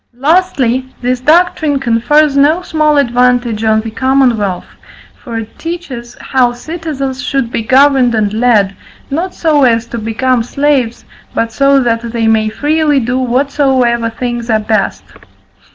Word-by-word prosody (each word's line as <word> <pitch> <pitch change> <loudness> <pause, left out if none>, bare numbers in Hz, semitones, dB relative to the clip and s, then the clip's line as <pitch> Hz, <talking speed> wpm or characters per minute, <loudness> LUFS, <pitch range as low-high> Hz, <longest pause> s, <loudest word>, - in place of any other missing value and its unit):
Lastly, 270 -5 +1
this 250 0 -1
doctrine 310 0 +2
confers 270 +4 +2
no 305 +6 +3
small 305 -3 +1
advantage 245 -3 +1
on 220 0 +2
the 225 0 -7
commonwealth; 240 -7 0 0.5
for 235 -4 -7
it 225 -1 -8
teaches 280 -9 -7
how 250 -2 +1
citizens 275 -1 -5
should 270 -4 -2
be - - -2
governed 260 0 +3
and 210 -2 0
led, 215 -4 +2 0.4
not 345 +6 -3
so 310 -3 +1
as 230 -2 +2
to 235 0 -6
become 235 +3 0
slaves, 260 -1 -1 0.3
but 230 0 -1
so 275 +3 +3
that 230 -1 0
they 235 -1 -3
may 220 -1 +2
freely 295 +4 +1
do 250 +1 -1
whatsoever 255 -2 +1
things 240 0 -5
are 220 -1 +2
best. 215 0 -1
250 Hz, 140 wpm, -13 LUFS, 230-285 Hz, 0.5 s, no